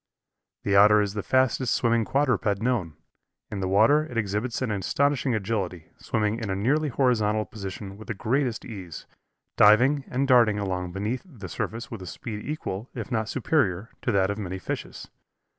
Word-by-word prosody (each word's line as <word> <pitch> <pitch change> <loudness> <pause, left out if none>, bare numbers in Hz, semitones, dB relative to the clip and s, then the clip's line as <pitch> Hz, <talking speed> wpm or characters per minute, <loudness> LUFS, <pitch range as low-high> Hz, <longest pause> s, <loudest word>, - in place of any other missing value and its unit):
The 100 - +1
Otter 105 +2 +7
is 100 -1 0
the 105 - -3
fastest 130 +1 +2
swimming 115 -4 +2
quadruped 125 -8 +1
known. 110 -9 -1 0.6
In 105 - -4
the 95 - -1
water 115 +11 +4
it 120 - -7
exhibits 110 +3 -1
an 120 - -1
astonishing 130 +6 +1
agility, 95 -6 -3
swimming 110 0 -1
in 110 -4 -4
a 95 - 0
nearly 145 +10 +1
horizontal 110 -5 +1
position 100 -1 -7
with 110 - -12
the 110 - -3
greatest 120 +3 -1
ease, 95 -8 -8 0.5
diving 125 +7 +5
and 135 +2 -1
darting 120 -5 +5
along 90 -3 -2
beneath 105 +7 -2
the 125 - -10
surface 115 +7 -5
with 115 -4 -6
a 90 - -8
speed 105 +3 -6
equal, 125 -7 -5
if - - -6
not 110 -2 -1
superior, 110 - 0
to - - 0
that 95 -1 +2
of 100 - -5
many 95 -2 -4
fishes. 95 - -6
110 Hz, 175 wpm, -26 LUFS, 100-125 Hz, 0.6 s, Otter